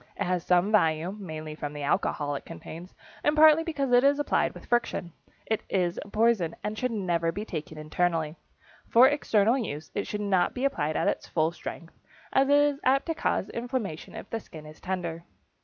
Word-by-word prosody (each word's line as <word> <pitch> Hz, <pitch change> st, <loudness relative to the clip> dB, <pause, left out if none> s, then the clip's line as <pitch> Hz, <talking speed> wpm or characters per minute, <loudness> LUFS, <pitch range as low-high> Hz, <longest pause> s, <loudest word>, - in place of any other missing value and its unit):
It -, -, -2 dB
has 180 Hz, -1 st, -1 dB
some 180 Hz, +3 st, +3 dB
value, 170 Hz, -2 st, +2 dB
mainly 155 Hz, -5 st, -6 dB
from 150 Hz, -1 st, -5 dB
the 145 Hz, -1 st, -6 dB
alcohol 145 Hz, 0 st, 0 dB
it 140 Hz, -, -4 dB
contains 165 Hz, +2 st, -10 dB, 0.3 s
and 295 Hz, -, +3 dB
partly 310 Hz, +1 st, +7 dB
because 285 Hz, -6 st, -2 dB
it 245 Hz, +1 st, +6 dB
is 280 Hz, +1 st, +4 dB
applied 290 Hz, -, +1 dB
with -, -, -11 dB
friction. 230 Hz, -8 st, -1 dB, 0.3 s
It 220 Hz, -, -1 dB
is 180 Hz, -2 st, 0 dB
a -, -, -14 dB
poison, 215 Hz, -6 st, +2 dB
and 210 Hz, -, -2 dB, 0.3 s
never 170 Hz, -2 st, +1 dB
should 165 Hz, -, -1 dB
be 210 Hz, -, -4 dB
taken 155 Hz, -4 st, -6 dB
internally. 160 Hz, 0 st, -1 dB, 0.5 s
For 245 Hz, +3 st, +7 dB
external 240 Hz, -4 st, +2 dB
use 155 Hz, -, -5 dB
it 200 Hz, -, -2 dB
should 210 Hz, -, -3 dB
not 190 Hz, -3 st, +1 dB
be 255 Hz, +2 st, -1 dB
applied 155 Hz, -, 0 dB
at -, -, 0 dB
full 160 Hz, 0 st, +2 dB
strength, 170 Hz, -1 st, -8 dB, 0.4 s
as 270 Hz, +1 st, +4 dB
it 285 Hz, -, +6 dB
is 290 Hz, -1 st, +3 dB
apt 270 Hz, +2 st, +3 dB
to 330 Hz, -, -1 dB
cause 325 Hz, -, -1 dB
inflammation 235 Hz, -, -4 dB
if -, -, -8 dB
the 225 Hz, -, -1 dB
skin 155 Hz, -7 st, -12 dB
is 155 Hz, 0 st, -13 dB
tender. 175 Hz, -3 st, -3 dB
185 Hz, 195 wpm, -27 LUFS, 160-245 Hz, 0.5 s, partly